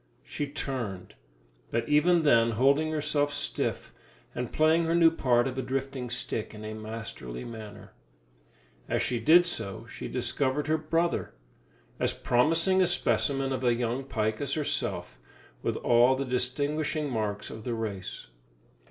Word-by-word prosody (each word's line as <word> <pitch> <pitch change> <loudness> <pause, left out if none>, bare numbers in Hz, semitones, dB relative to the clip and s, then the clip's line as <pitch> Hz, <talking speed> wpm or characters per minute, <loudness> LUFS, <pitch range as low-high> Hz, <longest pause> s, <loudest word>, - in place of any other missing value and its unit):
She 145 - -4
turned, 120 -10 -5 0.6
but 115 - -1
even 160 +3 +4
then 115 -5 +4
holding 140 +7 +3
herself 150 -1 0
stiff, 145 - -2 0.4
and 125 -1 -4
playing 160 +2 +3
her 165 +1 +1
new 165 -1 +6
part 125 -5 +2
of 130 - -4
a - - +1
drifting 130 0 -3
stick 115 -2 -4
in 105 0 -8
a 110 - -5
masterly 110 - -7
manner. 110 -3 -9 1.0
As - - +1
she 125 -2 -1
did 165 +9 +6
so 100 - -3
she - - -7
discovered 140 +1 -1
her 155 +1 +1
brother, 165 +2 -1 0.6
as - - +1
promising 165 +9 +2
a 185 - +4
specimen 135 -4 +1
of 130 - -3
a 120 -1 +3
young 120 +2 -1
pike 110 -4 -2
as 140 -1 -1
herself, 145 - -2 0.4
with - - -1
all 120 +2 +4
the 135 +1 -2
distinguishing 145 +4 -1
marks 110 -5 -3
of 110 - -8
the 120 -1 -2
race. 100 - -5
130 Hz, 150 wpm, -28 LUFS, 115-150 Hz, 1.0 s, new